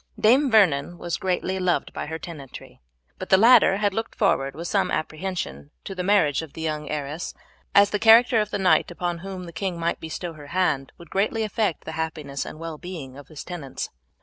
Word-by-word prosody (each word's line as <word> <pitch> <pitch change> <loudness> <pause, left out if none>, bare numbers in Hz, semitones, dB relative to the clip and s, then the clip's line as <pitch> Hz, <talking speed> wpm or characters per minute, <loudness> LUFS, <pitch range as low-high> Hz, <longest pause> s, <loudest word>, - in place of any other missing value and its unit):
Dame 260 +6 +5
Vernon 175 - +3
was 175 -1 -3
greatly 185 0 -1
loved 180 -1 0
by - - -5
her 160 +1 -4
tenantry; 150 -6 -10 0.4
but 185 - -6
the 190 - +7
latter 225 -2 +6
had 205 -1 +1
looked 225 +2 -4
forward 135 -10 +1
with 170 +2 -5
some - - +1
apprehension 155 - -4
to 195 - -6
the 185 - -4
marriage 180 -7 +3
of 160 -3 -10
the 160 - -8
young 150 -2 -3
heiress, 150 +2 -4 0.4
as 200 0 +6
the 210 - 0
character 225 +1 +6
of 210 - -2
the 205 - -2
knight 190 -2 +3
upon 175 -1 -3
whom 190 0 -7
the 170 - -10
king 175 +1 -3
might 170 0 -1
bestow 165 +2 -5
her 150 -2 -12
hand 150 -5 0
would 170 -2 -15
greatly 215 +3 0
affect 210 -4 -1
the 160 - -5
happiness 155 -3 -4
and - - -8
well 160 -1 -7
being 165 -8 -8
of 140 0 -12
his 155 -3 -9
tenants. 155 -7 -6
175 Hz, 205 wpm, -24 LUFS, 155-195 Hz, 0.4 s, the